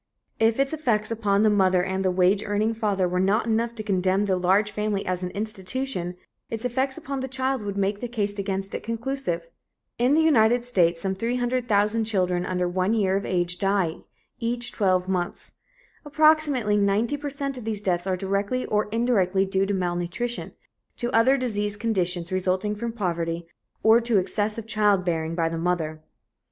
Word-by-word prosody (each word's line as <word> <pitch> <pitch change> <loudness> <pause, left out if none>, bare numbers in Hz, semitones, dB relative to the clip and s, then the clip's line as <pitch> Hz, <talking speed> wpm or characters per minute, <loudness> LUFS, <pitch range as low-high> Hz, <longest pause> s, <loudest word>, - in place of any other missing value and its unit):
If 225 +2 +3
its 275 +2 +1
effects 230 -9 0
upon 210 -2 +1
the 215 - +5
mother 185 -3 +3
and 190 +1 -2
the 190 - +2
wage 185 +2 +3
earning 210 +2 0
father 205 -5 0
were 180 +1 -1
not 200 +5 +2
enough 230 +1 0
to 215 - -5
condemn 190 0 +1
the 190 -2 +1
large 190 +4 +2
family 210 -1 -2
as 185 0 -2
an 180 - -3
institution, 200 -1 -3 0.3
its 225 +2 -4
effects 260 +2 -1
upon 280 -4 -4
the 265 - -3
child 260 -1 -1
would 200 -1 -4
make 200 +1 0
the 245 - -2
case 205 -3 -1
against 195 0 -2
it - - -3
conclusive. 230 -7 -3 0.5
In 250 +4 +3
the 320 - +4
United 240 -5 +4
States, 175 -8 +2
some 190 -1 0
300,000 230 -1 0
children 180 -4 0
under 180 -1 0
one 185 +4 0
year 195 -3 +2
of 200 - -2
age 175 -1 -1
die 195 -5 +1 0.4
each 240 +1 -2
twelve 185 -3 +1
months. 180 -2 -3 0.5
Approximately 295 -7 +3
ninety 205 +6 +1
per 290 0 -5
cent 275 -1 -3
of - - -9
these 220 -2 -2
deaths 185 -2 -1
are 185 -1 0
directly 200 +6 -1
or 210 0 0
indirectly 200 -5 +2
due 195 0 0
to 205 - 0
malnutrition, 180 +6 -3 0.4
to 240 0 -2
other 255 +4 +4
diseased 210 -5 -2
conditions 180 -6 -1
resulting 185 +2 0
from 230 +3 -4
poverty, 170 -6 -2 0.4
or 220 +1 +6
to 235 -2 +1
excessive 210 +3 -1
childbearing 185 -7 +1
by 165 -1 +1
the 165 0 -3
mother. 165 -3 -1
205 Hz, 175 wpm, -25 LUFS, 185-235 Hz, 0.5 s, or